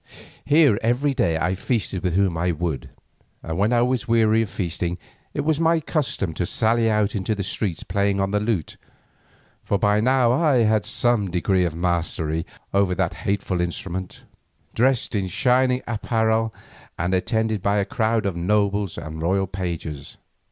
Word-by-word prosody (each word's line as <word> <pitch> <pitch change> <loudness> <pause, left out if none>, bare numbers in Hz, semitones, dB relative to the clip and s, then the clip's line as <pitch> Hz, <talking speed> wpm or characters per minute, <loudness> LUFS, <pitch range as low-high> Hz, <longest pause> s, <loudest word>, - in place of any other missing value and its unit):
Here 145 -8 +4
every 125 +5 +1
day 85 -10 +1
I 80 +3 0
feasted 100 -2 -2
with 90 -2 -1
whom 95 -3 +2
I 85 +2 0
would, 80 -3 -3 0.5
and 80 - -4
when 105 +3 +2
I 120 -1 +3
was 125 -2 -1
weary 115 -1 +3
of 110 - -2
feasting 85 -2 -3 0.4
it - - 0
was 155 0 0
my 165 0 +3
custom 140 - -2
to 90 - -2
sally 115 0 +2
out 105 -1 +1
into 105 +1 -1
the 100 - -3
streets 95 -2 -2
playing 100 -1 0
on 95 0 0
the 105 - +1
lute, 105 -6 -2 0.8
for 100 - 0
by 105 +1 +2
now 125 +1 +3
I 135 -3 +3
had 110 -1 +2
in - - -8
some 120 -5 +1
degree 90 +1 +1
mastered 80 -1 -1 0.3
that 100 -2 +1
hateful 100 -3 -2
instrument, 90 +1 -4 0.5
dressed 130 0 +1
in 100 -3 0
shining 125 +5 +2
apparel 110 0 0 0.5
and 90 +3 -1
attended 110 +2 0
by 100 +2 +1
a 100 - +1
crowd 110 0 0
of 95 -3 -1
nobles 100 +1 0
and 80 0 -6
royal 95 +4 +1
pages. 85 -6 -5
100 Hz, 165 wpm, -23 LUFS, 90-115 Hz, 0.8 s, Here